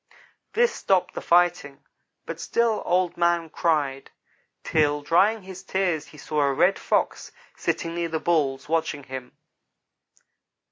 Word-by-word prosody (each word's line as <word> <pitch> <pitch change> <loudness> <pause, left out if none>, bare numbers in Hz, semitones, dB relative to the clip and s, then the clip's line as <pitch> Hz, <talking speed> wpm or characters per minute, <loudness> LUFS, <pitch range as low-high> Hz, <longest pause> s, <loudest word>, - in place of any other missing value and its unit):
This 475 +1 +3
stopped 190 -2 +1
the - - -5
fight; 175 0 +3 0.6
but - - -6
still 230 -2 +1
Old 180 -1 +1
man 170 -2 +1
cried, 145 -5 0 0.5
till, 150 -2 +1
drying 195 +7 +3
his 190 0 -9
tears, 185 -5 -1
he 150 - -15
saw 150 +1 -2
a 140 -1 +3
Red 185 +8 +3
Fox - - -1 0.2
sitting 165 - -2
near 170 0 -2
the 160 0 -2
Bulls, 145 -5 0
watching 160 -2 -1
him. 130 -2 -8
165 Hz, 135 wpm, -25 LUFS, 150-185 Hz, 0.6 s, This